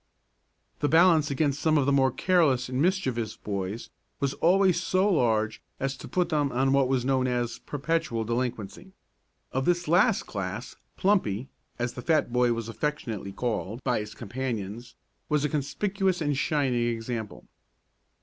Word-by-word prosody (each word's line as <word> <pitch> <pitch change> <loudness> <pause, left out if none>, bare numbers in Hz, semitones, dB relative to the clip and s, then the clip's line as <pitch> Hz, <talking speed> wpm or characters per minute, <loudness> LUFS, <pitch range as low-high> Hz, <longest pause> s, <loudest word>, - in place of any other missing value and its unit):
The 145 - +1
balance 165 -2 +5
against 140 0 0
some 155 -1 +3
of 140 - +2
the 140 - +2
more 135 -1 +4
careless 140 -7 +2
and 130 +1 -1
mischievous 130 - 0
boys 100 +2 -4 0.3
was 140 -2 0
always 180 0 +3
so 185 +3 +2
large 110 - +1 0.2
as 135 0 -1
to - - -9
put 180 -2 0
them 145 -4 +1
on 135 +2 +2
what 135 -1 +4
was 130 -2 0
known 130 -1 +2
as 120 -1 -1
perpetual 145 -5 -2
delinquency. 120 - -4 0.6
Of 130 +1 -1
this 175 -1 +1
last 190 +7 +4
class 100 +4 -5 0.2
"Plumpy," 135 - +1 0.3
as 120 0 -2
the 125 - -7
fat 155 -4 +1
boy 125 -1 +3
was 115 -1 -2
affectionately 115 -6 -3
called 115 +1 -3
by - - +1
his 105 0 -7
companions, 115 -1 -5 0.3
was 150 -1 +2
a - - 0
conspicuous 190 +6 -1
and 145 -3 0
shining 130 -4 +1
example. 115 -1 -4
130 Hz, 155 wpm, -27 LUFS, 115-160 Hz, 0.6 s, balance